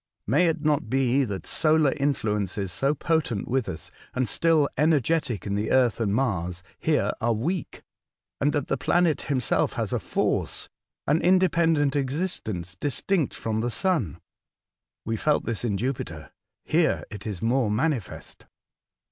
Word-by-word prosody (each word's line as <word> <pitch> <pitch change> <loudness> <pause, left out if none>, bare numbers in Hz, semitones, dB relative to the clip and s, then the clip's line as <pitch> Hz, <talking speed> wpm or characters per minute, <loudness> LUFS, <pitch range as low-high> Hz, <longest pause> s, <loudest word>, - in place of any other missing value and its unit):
May 150 - +3
it 160 -2 -1
not 150 -6 +1
be 135 +1 +2
that 100 -4 -5
solar 155 -3 +3
influences, 105 -8 -1
so 135 - +1
potent 150 - -1
with 125 -4 0
us, 80 - -5 0.2
and 130 -1 +1
still 160 +4 +3
energetic 150 - +1
in 100 - -2
the 105 +2 -1
Earth 125 -4 +3
and 110 -4 0
Mars, 90 -7 -1 0.2
here - - +1
are 115 +1 +2
weak, 155 - -3 0.6
and 145 - +2
that 145 -3 -1
the 135 - -1
planet 170 +4 +2
himself 130 -4 0
has - - -2
a - - +1
force, - - -1 0.2
— - - -63
an 150 +3 +3
independent 170 -5 +3
existence 130 - -2
distinct 145 - -1
from 110 -1 -2
the 120 - -1
sun? 135 - 0 0.9
We 115 0 -1
felt 150 +6 +1
this 115 -1 -3
in 105 -5 0
Jupiter; 130 +4 -4 0.3
here - - +2
it 105 +1 -7
is 100 -3 -5
more 120 0 +2
manifest." 115 - -2
130 Hz, 150 wpm, -26 LUFS, 110-155 Hz, 0.9 s, May